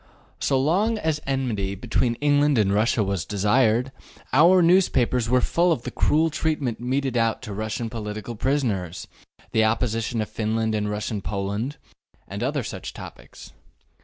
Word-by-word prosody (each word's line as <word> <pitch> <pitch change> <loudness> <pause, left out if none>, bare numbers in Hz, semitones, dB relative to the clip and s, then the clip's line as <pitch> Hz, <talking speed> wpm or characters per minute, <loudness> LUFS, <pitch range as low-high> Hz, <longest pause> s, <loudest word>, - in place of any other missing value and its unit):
So 135 -2 +1
long 195 +11 +1
as 160 -6 -1
enmity 115 -8 -1
between 115 +3 0
England 145 0 +2
and 100 -2 +2
Russia 110 +1 +2
was 95 -3 -2
desired, 110 +4 +2 0.4
our 175 +6 +6
newspapers 130 -10 +3
were 125 0 +3
full 175 +6 +2
of 125 -8 -1
the - - -5
cruel 160 +2 +2
treatment 150 -6 -1
meted 130 +1 -1
out 115 +1 +1
to 105 -4 -6
Russian 110 +3 -3
political 110 0 -6
prisoners, 105 - -1 0.4
the 110 - +2
oppression 115 +1 0
of 110 - -1
Finland 110 0 -1
and 105 -1 -1
Russian 105 0 -3
Poland, 100 +8 -3 0.5
and 100 +2 -6
other 135 +2 -1
such - - -6
topics. - - -12
120 Hz, 150 wpm, -24 LUFS, 105-140 Hz, 0.5 s, our